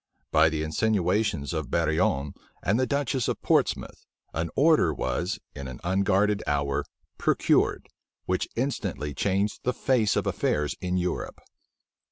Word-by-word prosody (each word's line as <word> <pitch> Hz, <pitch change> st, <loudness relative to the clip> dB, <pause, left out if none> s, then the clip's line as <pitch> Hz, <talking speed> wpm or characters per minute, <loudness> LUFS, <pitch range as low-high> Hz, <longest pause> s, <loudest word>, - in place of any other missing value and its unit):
By 80 Hz, 0 st, +5 dB
the 80 Hz, -1 st, -2 dB
insinuations 95 Hz, -2 st, 0 dB
of 80 Hz, -6 st, -3 dB
Barillon 75 Hz, -3 st, +1 dB, 0.3 s
and 105 Hz, +5 st, +2 dB
the 130 Hz, -, +2 dB
duchess 140 Hz, -3 st, 0 dB
of -, -, -1 dB
Portsmouth, -, -, 0 dB, 0.3 s
an 80 Hz, +1 st, -2 dB
order 150 Hz, -, +4 dB
was, 85 Hz, +9 st, -2 dB, 0.2 s
in 70 Hz, -1 st, -7 dB
an 65 Hz, -1 st, -8 dB
unguarded 100 Hz, +3 st, +2 dB
hour, 70 Hz, -1 st, 0 dB, 0.4 s
procured, -, -, +2 dB, 0.4 s
which 90 Hz, 0 st, -1 dB
instantly 115 Hz, -, -2 dB
changed 100 Hz, +8 st, 0 dB
the 125 Hz, -, 0 dB
face 120 Hz, -7 st, +2 dB
of -, -, 0 dB
affairs 75 Hz, 0 st, 0 dB
in 90 Hz, 0 st, -1 dB
Europe. 90 Hz, 0 st, -3 dB
90 Hz, 135 wpm, -27 LUFS, 75-105 Hz, 0.4 s, By